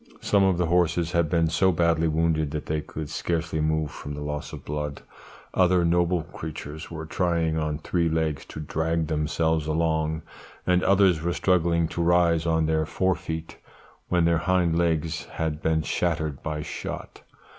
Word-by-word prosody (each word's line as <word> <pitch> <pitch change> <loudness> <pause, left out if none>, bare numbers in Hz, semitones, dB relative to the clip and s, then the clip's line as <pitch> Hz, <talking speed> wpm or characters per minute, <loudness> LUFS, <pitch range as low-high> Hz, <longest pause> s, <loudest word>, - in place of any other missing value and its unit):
Some 100 -1 +3
of 95 -2 +3
the 90 - +1
horses 85 -1 +2
had 85 -3 +1
been 85 0 +2
so 95 +4 +3
badly 85 -1 +2
wounded 80 -1 +1
that 75 0 -4
they 75 0 -1
could 75 0 -6
scarcely 80 +1 -2
move 80 -1 0
from 75 0 -7
the 75 - -5
loss 75 0 -4
of - - -9
blood; 75 -1 -4 0.5
other 90 -1 +3
noble 85 0 +2
creatures 80 -2 -7
were 80 -1 -6
trying 85 -1 0
on 75 -1 -1
three 85 +2 0
legs 80 -3 -1
to - - -9
drag 80 +2 -1
themselves 80 0 0
along, 80 0 0 0.4
and 90 0 +3
others 95 -4 +4
were 85 +1 0
struggling 85 -3 +2
to 85 - -3
rise 85 -1 +3
on 80 -1 +2
their 80 0 +1
fore 95 +3 +1
feet, 80 -1 -6 0.5
when 90 -2 +3
their 85 -1 +3
hind 85 -1 +2
legs 80 -2 0
had 80 -1 -3
been 80 -1 +1
shattered 80 -3 -1
by 75 -1 -3
shot. - - -6
80 Hz, 170 wpm, -26 LUFS, 80-85 Hz, 0.5 s, others